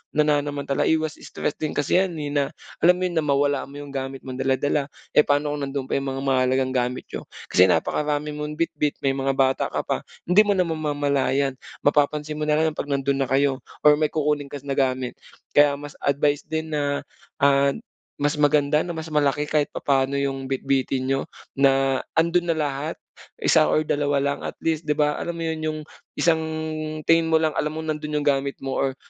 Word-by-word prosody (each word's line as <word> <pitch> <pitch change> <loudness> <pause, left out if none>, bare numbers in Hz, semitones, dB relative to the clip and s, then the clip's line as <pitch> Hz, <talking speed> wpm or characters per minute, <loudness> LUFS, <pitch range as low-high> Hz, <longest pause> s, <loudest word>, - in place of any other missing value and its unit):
nananamantala, 145 -2 +1
iwas 155 -1 0
stress - - -3
din 155 - -3
kasi 145 +5 +2
'yan, 185 -3 0
eh, 145 -2 -4
na 145 -1 +2 0.4
alam 180 +1 +5
mo 185 - -4
yun, 180 - 0
na - - -1
mawala 140 0 +2
mo 140 - -13
'yung 145 -1 -8
gamit 135 0 -5
mong 130 0 -7
dala-dala. 135 +2 +1 0.2
Eh, - - +4
paano 145 +1 +2
kung 145 -1 -3
nandun 135 -1 -3
pa 135 - -1
'yung 135 - -5
mga 135 - -4
mahalagang 130 0 +2
gamit 125 0 -1
niyo? - - -6 0.2
Kasi 90 +1 +6
napakarami 150 +9 0
mong 150 0 -5
bitbit, 150 -2 -1
may 135 - +3
mga 135 0 -1
bata 135 0 +2
ka - - -3
pa, - - -1 0.2
hindi 205 +4 +5
mo 205 - +3
naman 170 -4 0
mamamalayan. 140 -2 0 0.2
Mapapansin 150 +1 +1
mo 150 - -2
nalang 155 +1 +2
ang - - -15
'pag 145 - -3
nando'n 140 0 0
na 135 - +1
kayo, 135 0 +2 0.2
or 150 0 +6
may 155 - +3
kukunin 150 -1 -1
ka 140 -1 -8
na 140 -1 -2
gamit. 130 -2 -1 0.3
Kaya 145 -1 +5
mas 145 +1 -8
advice 145 +1 +1
din 160 0 -3
na, 145 -1 -1 0.4
ah, 140 0 +4 0.4
mas 145 +1 -1
maganda 145 0 +3
na 170 +1 -3
mas 160 0 -6
malaki 145 -1 +2
kahit 150 -1 +1
papaano 135 0 +1
'yung 135 -1 -2
bitbitin 135 -1 0
niyo 135 - +1 0.4
na 135 -1 +3 0.2
ando'n 170 +2 +2
na 165 - +2
lahat 150 0 -2 0.5
isa 155 -2 +5
or 155 - +2
dalawa 145 -2 0
lang 140 0 -1
at - - -5
least 160 -1 -1
'di 150 - +2
ba, 150 -1 +1
alam 170 0 -3
mo 165 - -4
yun, 160 -1 -2
'yung 155 0 -2 0.4
isang 165 -2 +3 0.6
tingin 165 +1 +4
mo 160 - +2
lang 160 -1 +3
alam 150 +1 -2
mong 160 0 -2
nando'n 150 0 -4
'yung - - -3
gamit 140 -1 +1
mo 135 - -3
or 135 -1 0
145 Hz, 200 wpm, -24 LUFS, 135-155 Hz, 0.6 s, Kasi